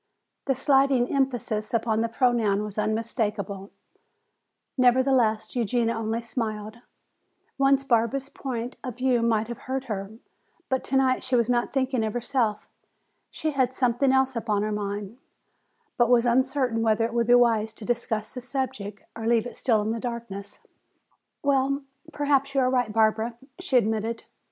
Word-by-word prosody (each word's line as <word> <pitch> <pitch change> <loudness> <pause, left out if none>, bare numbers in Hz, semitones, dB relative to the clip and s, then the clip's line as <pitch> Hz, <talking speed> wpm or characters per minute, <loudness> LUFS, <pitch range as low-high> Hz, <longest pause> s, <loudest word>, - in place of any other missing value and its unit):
The 270 - +1
slighting 270 -2 +3
emphasis 240 -5 -1
upon 220 -1 +1
the 230 +1 0
pronoun 225 -4 +2
was 210 0 -5
unmistakable; 210 -2 -2 1.1
nevertheless, 250 -4 +3
Eugenia 235 0 +1
only 225 +1 -2
smiled. 220 -2 -4 0.8
Once 275 0 +4
Barbara's 260 +2 +1
point 250 -3 -5
of 250 -4 -6
view 255 -2 +2
might 225 -2 +1
have 235 - -6
hurt 265 0 -1
her, 200 -6 -4 0.6
but 260 -1 0
tonight 265 -1 +1
she 260 0 0
was 235 0 +2
not 240 -1 0
thinking 260 -3 0
of 215 -1 -2
herself. 240 -3 -1 0.6
She 315 - -3
had 260 -2 0
something 255 +1 +2
else 265 -1 +2
upon 215 -3 0
her 215 - -1
mind, 205 +2 -4 0.8
but 240 -1 +3
was 245 -1 +4
uncertain 255 -1 +1
whether 225 0 +2
it 230 - -4
would 235 -1 +1
be 245 - +7
wise 225 -3 +3
to 220 - -9
discuss 225 -2 -2
the 250 - -6
subject, 240 -6 -4
or 225 -1 -4
leave 235 -1 +3
it 245 - -7
still 220 -5 +1
in 225 +2 -2
darkness. 225 -4 -6 0.9
"Well, 275 0 +1 0.3
perhaps 280 -2 +1
you 270 - +4
are 255 0 +2
right, 245 -4 +1
Barbara," 220 +1 +1 0.2
she 275 -8 +1
admitted. 225 0 0
235 Hz, 150 wpm, -26 LUFS, 220-260 Hz, 1.1 s, be